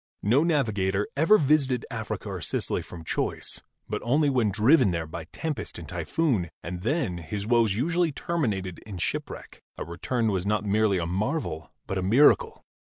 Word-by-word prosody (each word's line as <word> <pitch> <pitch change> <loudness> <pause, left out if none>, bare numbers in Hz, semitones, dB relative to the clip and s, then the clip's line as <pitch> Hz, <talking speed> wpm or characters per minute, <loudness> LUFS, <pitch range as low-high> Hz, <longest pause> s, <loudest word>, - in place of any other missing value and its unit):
No 125 +9 +4
navi 145 -10 +1
gator 95 +1 0
ever 165 +10 +5
visited 140 - +2
Africa - - -4
or - - -5
Sicily - - -1
from 85 -2 -10
choice, - - -1 0.3
but - - -3
only 145 +4 +2
when 120 -5 +2
driven 115 +5 +4
there 85 -2 -2
by 80 0 -7
tempest 145 - -5
and - - -8
typhoon, 125 - 0
and 90 +1 -5
then 110 - -1
his 100 +5 -5
woes 115 -3 +3
usually 165 +7 +1
terminated 105 - -2
in 100 -4 -9
shipwreck; - - -4 0.2
a - - -4
return 110 +8 -1
was 95 -2 -1
not 105 +1 0
merely 105 -1 +2
a 85 - -1
marvel 90 - -2
but 95 - -2
a - - -1
miracle. 120 +11 +4
110 Hz, 170 wpm, -26 LUFS, 95-140 Hz, 0.3 s, ever